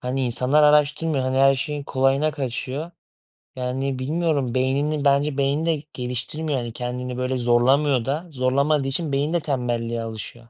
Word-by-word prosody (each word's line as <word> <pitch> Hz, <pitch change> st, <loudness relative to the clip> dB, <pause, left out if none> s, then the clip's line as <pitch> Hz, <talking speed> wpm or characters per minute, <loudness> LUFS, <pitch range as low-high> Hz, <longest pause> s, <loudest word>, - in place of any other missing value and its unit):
Hani 130 Hz, +1 st, -2 dB
insanlar 125 Hz, +5 st, +2 dB
araştırmıyor 150 Hz, -1 st, +3 dB
hani 130 Hz, 0 st, -1 dB
her 135 Hz, 0 st, +6 dB
şeyin 145 Hz, +2 st, -3 dB
kolayına 135 Hz, +2 st, +1 dB
kaçıyor. 135 Hz, +3 st, -4 dB, 0.7 s
Yani 130 Hz, +1 st, -2 dB
bilmiyorum 145 Hz, -3 st, -1 dB
beynini 140 Hz, +3 st, 0 dB
bence 140 Hz, 0 st, +2 dB
beynini 140 Hz, +3 st, +1 dB
de 160 Hz, -3 st, 0 dB
geliştirmiyor, 130 Hz, +4 st, -3 dB
hani, 120 Hz, -1 st, -5 dB
kendini 125 Hz, +1 st, -4 dB
böyle 130 Hz, +1 st, -1 dB
zorlamıyor 125 Hz, +2 st, +3 dB
da 150 Hz, +6 st, -2 dB
zorlamadığı 140 Hz, +1 st, +1 dB
için 150 Hz, +3 st, -2 dB
beyin 145 Hz, +4 st, 0 dB
de 175 Hz, -, +2 dB
tembelliğe 120 Hz, -5 st, -2 dB
alışıyor. 110 Hz, -1 st, -6 dB
135 Hz, 150 wpm, -23 LUFS, 125-150 Hz, 0.7 s, her